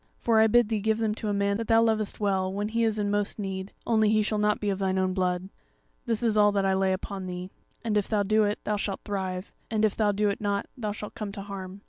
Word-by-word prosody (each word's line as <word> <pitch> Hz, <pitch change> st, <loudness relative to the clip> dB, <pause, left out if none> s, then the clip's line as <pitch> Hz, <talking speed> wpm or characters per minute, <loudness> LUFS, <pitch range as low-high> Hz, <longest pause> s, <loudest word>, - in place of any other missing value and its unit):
For 230 Hz, -2 st, +2 dB
I 220 Hz, -, +6 dB
bid 240 Hz, 0 st, +4 dB
thee 220 Hz, -2 st, 0 dB
give 220 Hz, +1 st, +1 dB
them 220 Hz, -2 st, 0 dB
to 220 Hz, -, -5 dB
a -, -, +1 dB
man 200 Hz, 0 st, +1 dB
that 225 Hz, 0 st, -4 dB
thou 225 Hz, 0 st, +5 dB
lovest 220 Hz, -2 st, +1 dB
that -, -, -17 dB
thou 210 Hz, -, -2 dB
lovest 190 Hz, -2 st, +1 dB
well, -, -, -5 dB
when 205 Hz, +1 st, -2 dB
he 230 Hz, +1 st, 0 dB
is 220 Hz, -1 st, +1 dB
in 205 Hz, -1 st, 0 dB
most 205 Hz, 0 st, 0 dB
need; 190 Hz, -2 st, -4 dB
only 220 Hz, -2 st, +3 dB
he 215 Hz, 0 st, +3 dB
shall 215 Hz, 0 st, 0 dB
not 210 Hz, 0 st, +2 dB
be 205 Hz, -1 st, 0 dB
of 195 Hz, -, -3 dB
thine 190 Hz, -1 st, 0 dB
own 185 Hz, 0 st, +1 dB
blood. 185 Hz, 0 st, -1 dB, 0.6 s
This 230 Hz, 0 st, 0 dB
is 220 Hz, -2 st, +3 dB
all 205 Hz, 0 st, +6 dB
that 200 Hz, -1 st, +1 dB
I 190 Hz, -, +3 dB
lay 190 Hz, 0 st, +2 dB
upon 190 Hz, 0 st, -4 dB
thee; 180 Hz, +1 st, -6 dB, 0.3 s
and 220 Hz, -3 st, -1 dB
if 205 Hz, -2 st, +1 dB
thou 210 Hz, -2 st, +2 dB
do 215 Hz, +2 st, +3 dB
it, 205 Hz, 0 st, 0 dB
thou 210 Hz, -, 0 dB
shalt 200 Hz, -1 st, -3 dB
thrive, 190 Hz, -2 st, -3 dB, 0.2 s
and 220 Hz, -2 st, +2 dB
if 210 Hz, -, 0 dB
thou 210 Hz, -2 st, +2 dB
do 205 Hz, +1 st, +1 dB
it 200 Hz, -, -3 dB
not, 200 Hz, -1 st, 0 dB
thou 215 Hz, -4 st, -3 dB
shalt 210 Hz, 0 st, -7 dB
come 210 Hz, -2 st, -5 dB
to 200 Hz, -, -6 dB
harm. 195 Hz, -1 st, -7 dB
205 Hz, 295 wpm, -27 LUFS, 195-215 Hz, 0.6 s, I